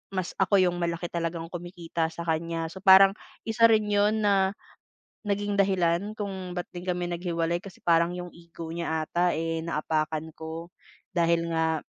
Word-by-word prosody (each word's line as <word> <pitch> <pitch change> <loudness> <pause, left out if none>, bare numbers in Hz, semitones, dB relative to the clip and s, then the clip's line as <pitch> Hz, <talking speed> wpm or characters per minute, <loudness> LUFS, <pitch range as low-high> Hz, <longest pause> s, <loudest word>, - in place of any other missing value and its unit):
mas 185 -2 -2
ako 195 +1 +4
yung 175 -1 +1
malaki 170 0 -2
talagang 165 -1 -3
kumikita 170 -2 -3
sa 170 +1 -7
kaniya, 165 0 -1
so 190 - -9
parang, 195 0 +8 0.4
isa 230 +1 +5
rin 220 -1 +4
yun 210 +1 +2
na, 195 -1 +3 0.7
naging 205 0 -1
dahilan 190 0 +2
kung 190 -4 -5
ba't 175 0 -4
din 175 0 -8
kami 180 -1 -1
naghiwalay 170 -1 -1
kasi 190 +1 -10
parang 170 0 +3
yung 180 0 -6
ego 170 -1 -10
niya 160 -1 -2
ata, 175 +1 +2
eh, 165 0 -2
naapakan 155 0 -1
ko 160 +1 -7 0.5
dahil 170 0 +2
nga 160 -1 0
175 Hz, 160 wpm, -27 LUFS, 165-190 Hz, 0.7 s, parang